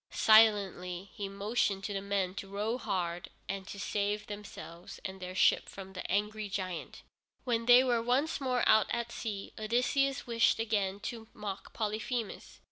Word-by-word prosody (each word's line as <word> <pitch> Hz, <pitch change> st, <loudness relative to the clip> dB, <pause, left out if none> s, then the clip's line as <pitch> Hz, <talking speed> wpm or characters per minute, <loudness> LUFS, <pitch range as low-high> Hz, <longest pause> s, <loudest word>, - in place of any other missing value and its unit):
Silently 200 Hz, -4 st, +4 dB
he 200 Hz, -1 st, -4 dB
motioned 200 Hz, 0 st, 0 dB
to 205 Hz, -, -3 dB
the 195 Hz, -, -2 dB
men 195 Hz, -2 st, -1 dB
to 195 Hz, 0 st, -6 dB
row 210 Hz, +5 st, -2 dB
hard, 175 Hz, -5 st, -2 dB, 0.2 s
and 195 Hz, 0 st, -4 dB
save 205 Hz, +1 st, -2 dB
themselves 205 Hz, -4 st, -9 dB
and 190 Hz, 0 st, -5 dB
their 185 Hz, 0 st, -6 dB
ship -, -, +4 dB
from 190 Hz, -1 st, -9 dB
the 185 Hz, -, -5 dB
angry 210 Hz, +2 st, 0 dB
giant. 185 Hz, -3 st, -4 dB, 0.4 s
When 230 Hz, -2 st, 0 dB
they 245 Hz, +1 st, +9 dB
were 240 Hz, -3 st, +2 dB
once 260 Hz, +7 st, +1 dB
more 255 Hz, -2 st, +1 dB
out 215 Hz, -1 st, +6 dB
at 235 Hz, 0 st, -2 dB
sea, 205 Hz, -5 st, -5 dB
Odysseus 250 Hz, +5 st, +1 dB
wished 235 Hz, -1 st, +3 dB
again 205 Hz, -3 st, 0 dB
to 225 Hz, +1 st, -6 dB
mock 205 Hz, -2 st, -6 dB
Polyphemus. 220 Hz, +1 st, -3 dB
210 Hz, 155 wpm, -32 LUFS, 195-230 Hz, 0.4 s, they